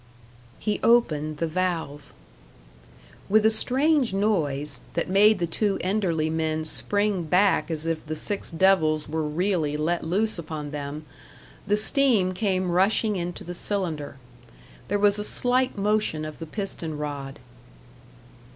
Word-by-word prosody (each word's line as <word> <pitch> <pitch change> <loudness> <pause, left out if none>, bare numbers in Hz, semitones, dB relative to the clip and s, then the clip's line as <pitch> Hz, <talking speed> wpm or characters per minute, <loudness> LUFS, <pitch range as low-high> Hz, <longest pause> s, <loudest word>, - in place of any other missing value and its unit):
He 210 -1 -2
opened 155 -11 +2
the 165 - -1
valve. 160 -4 -3 1.2
With 215 +2 +4
a 220 - +6
strange 265 +1 +2
noise, 155 -9 -1
that 170 - -1
made 210 +2 +5
the 175 - -1
two 195 +4 0
Enderley 180 -5 0
men 160 0 -1
spring 205 +4 +1
back 185 +5 +2
as 160 -1 -4
if 165 -1 -2
the 155 - -3
six 200 +6 -4
devils 160 -4 +2
were 160 +2 -2
really 155 -1 -1
let 165 +3 -1
loose 195 +4 -1
upon 155 -3 -6
them, 145 +1 -6 0.6
the 205 - +3
steam 215 -4 +3
came 185 -2 -1
rushing 200 +4 +2
into 175 -1 -4
the 175 - -7
cylinder. 170 -8 -3 0.7
There 205 - 0
was 205 0 +3
a - - -2
slight 250 +3 0
motion 205 -6 0
of 155 -1 -8
the 165 - -7
piston 165 -4 -4
rod. 145 -2 -5
180 Hz, 140 wpm, -25 LUFS, 155-205 Hz, 1.2 s, a